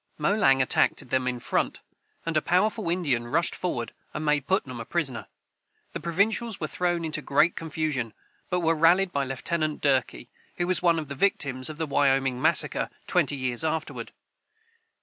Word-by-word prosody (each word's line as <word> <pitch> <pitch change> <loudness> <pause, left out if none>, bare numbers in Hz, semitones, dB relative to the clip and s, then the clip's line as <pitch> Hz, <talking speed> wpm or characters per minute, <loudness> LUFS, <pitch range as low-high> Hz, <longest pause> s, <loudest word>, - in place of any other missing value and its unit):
Molang 150 -6 +3
attacked 125 - +1
them 130 0 0
in 125 -1 -2
front, - - -1 0.4
and 165 -1 -2
a 155 - +3
powerful 195 +2 +1
Indian 145 -10 0
rushed 165 +8 +1
forward 120 -11 -3 0.2
and 155 - -3
made 150 -2 +1
Putnam 135 - -1
a - - -4
prisoner. 140 -7 -2 0.7
The - - -4
provincials 205 +5 0
were 155 - -2
thrown 175 +1 -1
into 155 -1 -2
great 145 +5 +2
confusion, 150 -8 -3 0.3
but 180 0 0
were 165 0 +3
rallied 175 +4 +4
by 140 -3 0
Lieutenant 155 +4 -2
Durkee, 130 -3 0 0.3
who 175 - 0
was 185 0 +1
one 170 -2 +3
of 155 -2 -3
the 140 - -5
victims 135 -5 0
of 155 - -7
the 160 - -1
Wyoming 135 -3 +1
massacre - - +3 0.2
twenty - - +1
years 130 0 -1
afterward. 160 0 -3
155 Hz, 170 wpm, -26 LUFS, 135-175 Hz, 0.7 s, rallied